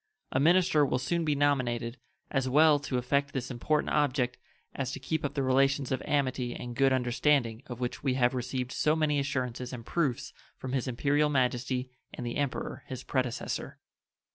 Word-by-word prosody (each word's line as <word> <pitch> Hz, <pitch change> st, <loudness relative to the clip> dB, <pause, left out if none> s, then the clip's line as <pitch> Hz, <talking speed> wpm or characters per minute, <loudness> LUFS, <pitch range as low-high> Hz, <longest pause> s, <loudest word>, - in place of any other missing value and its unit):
A 130 Hz, -, +1 dB
minister 165 Hz, 0 st, +4 dB
will 135 Hz, -, +1 dB
soon 170 Hz, +6 st, -1 dB
be 150 Hz, -1 st, +1 dB
nominated, 125 Hz, -4 st, 0 dB, 0.3 s
as 135 Hz, -2 st, 0 dB
well 150 Hz, +2 st, +6 dB
to 135 Hz, -2 st, -2 dB
effect 140 Hz, +3 st, 0 dB
this 130 Hz, -1 st, -3 dB
important 150 Hz, +5 st, 0 dB
object 130 Hz, -4 st, +1 dB, 0.3 s
as 135 Hz, -2 st, -3 dB
to -, -, -5 dB
keep 160 Hz, +4 st, -2 dB
up 145 Hz, 0 st, -3 dB
the 140 Hz, -, 0 dB
relations 135 Hz, +1 st, +2 dB
of 130 Hz, -, 0 dB
amity 130 Hz, -4 st, 0 dB
and 120 Hz, -1 st, -6 dB
good 135 Hz, +2 st, +4 dB
understanding 125 Hz, -1 st, +1 dB
of 120 Hz, -1 st, -7 dB
which 125 Hz, 0 st, -3 dB
we 130 Hz, -3 st, 0 dB
have 125 Hz, -1 st, +3 dB
received 125 Hz, 0 st, -3 dB
so 155 Hz, +1 st, +2 dB
many 150 Hz, -2 st, +1 dB
assurances 125 Hz, -3 st, -2 dB
and 120 Hz, -3 st, -7 dB
proofs 140 Hz, -5 st, -1 dB, 0.2 s
from 130 Hz, 0 st, -5 dB
His 135 Hz, -1 st, -1 dB
Imperial 145 Hz, +4 st, +2 dB
Majesty 125 Hz, -1 st, 0 dB, 0.2 s
and 125 Hz, -, -6 dB
the 120 Hz, -, -3 dB
Emperor 140 Hz, -2 st, -2 dB
his 130 Hz, -1 st, -6 dB
predecessor. 130 Hz, -3 st, -2 dB
130 Hz, 180 wpm, -29 LUFS, 125-145 Hz, 0.3 s, well